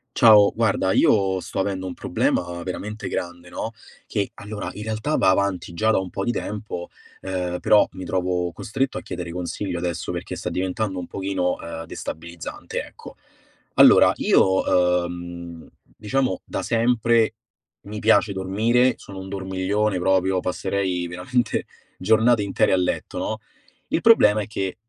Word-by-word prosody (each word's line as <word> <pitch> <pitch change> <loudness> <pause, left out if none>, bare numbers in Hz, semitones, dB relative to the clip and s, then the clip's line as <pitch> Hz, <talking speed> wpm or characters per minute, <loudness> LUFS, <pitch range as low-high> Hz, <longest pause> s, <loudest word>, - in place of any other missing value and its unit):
Ciao, 105 -3 +7
guarda, 105 -4 +1
io 95 -1 +3
sto 95 - -5
avendo 95 -1 -1
un 90 - -5
problema 85 0 -1
veramente 105 +3 -5
grande, 85 0 -5
no, 110 - -4 0.4
che 100 -3 -1
allora 105 +1 -6
in 105 - -7
realtà, 110 +8 -2
va - - +4
avanti 95 -3 0
già 110 +6 +1
da - - +3
un 95 -1 -5
po' 95 +2 -4
di 120 - +1
tempo, 105 -6 -5 0.3
ehm, 90 -2 -3
però 105 - +5
mi 95 - -7
trovo 90 -1 -1
costretto 130 +10 -2
a - - -4
chiedere 90 -2 -6
consiglio 90 +1 -4
adesso 85 -2 -3
perché - - -5
sta - - -4
diventando 95 +1 -2
un 90 - -6
pochino, 95 -2 -1
ehm, 80 0 -6
destabilizzante 85 +1 -6
ecco. - - -13 0.6
Allora - - +7
io, 90 -2 +3
uhm, 85 -1 -8 0.3
diciamo 110 -2 -1
da - - -4
sempre, 115 -1 +2 0.5
mi 105 +1 -7
piace 105 -1 +3
dormire, 110 +7 +2
sono 100 - -11
un 95 0 -8
dormiglione 95 +1 -1
proprio, 95 +1 +2
passerei 90 -1 -1
veramente 105 +9 -1 0.3
giornate 110 +2 +3
intere 100 - +1
a - - +6
letto, 90 -1 -2
no, - - -2 0.5
il - - 0
problema 110 - +6
è 100 - -5
che 95 -3 -3
95 Hz, 150 wpm, -23 LUFS, 90-105 Hz, 0.6 s, Ciao